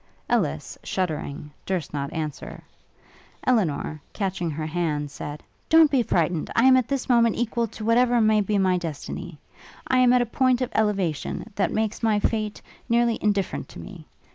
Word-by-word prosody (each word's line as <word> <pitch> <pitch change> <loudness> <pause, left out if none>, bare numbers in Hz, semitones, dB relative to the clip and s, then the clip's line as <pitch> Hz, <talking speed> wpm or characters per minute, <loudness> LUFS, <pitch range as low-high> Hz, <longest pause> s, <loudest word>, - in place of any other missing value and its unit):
Ellis, - - -1
shuddering, 150 -5 -3
durst 180 -7 -3
not 140 -1 -3
answer. 155 -3 -5 0.8
Elinor, 160 - 0
catching 190 -4 -2
her 155 0 -4
hand 155 -3 -2
said, 145 +1 -7 0.3
'Don't 320 -2 +6
be 270 -3 +3
frightened! 170 -6 0
I 230 - +4
am 260 0 +7
at 255 -2 +2
this 275 -2 -2
moment 235 -3 +4
equal 235 0 -1
to 215 0 -8
whatever 240 +1 +4
may 215 -1 +4
be 205 +1 0
my 185 -2 +2
destiny: 170 +1 -6 0.5
I 255 - +3
am 250 -1 +5
at 250 -1 +4
a - - -4
point 255 +1 +2
of 255 -1 -2
elevation, 200 -1 -1
that 200 - 0
makes 220 0 -1
my 220 -2 +2
fate 215 0 -2 0.3
nearly 235 -1 +2
indifferent 195 - -1
to - - -11
me. - - -10
210 Hz, 165 wpm, -24 LUFS, 165-235 Hz, 0.8 s, am